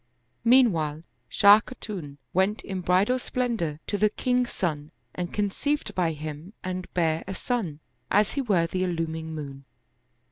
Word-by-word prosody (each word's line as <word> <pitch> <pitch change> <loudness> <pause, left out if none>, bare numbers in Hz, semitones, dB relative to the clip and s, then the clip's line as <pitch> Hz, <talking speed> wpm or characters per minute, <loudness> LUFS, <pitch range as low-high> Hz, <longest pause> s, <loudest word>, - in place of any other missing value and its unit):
Meanwhile 175 - +4 0.3
Shah 205 0 +7
Khatun 195 - -7 0.2
went 190 +4 +1
in 190 -2 -4
bridal 190 +8 +3
splendor 230 -13 -2
to 205 - -2
the 215 - +4
king's 250 +3 0
son 150 -4 -2 0.2
and 175 -1 -4
conceived 245 +9 -1
by 170 -3 +1
him 155 +5 -7
and 185 0 -4
bare 165 -2 +1
a 195 - -4
son, 185 - -2 0.3
as 210 0 +3
he 280 - -1
were 195 -9 +2
the 185 +3 -2
illuming 165 -3 -2
moon. 140 -2 -7
185 Hz, 145 wpm, -26 LUFS, 160-215 Hz, 0.3 s, Shah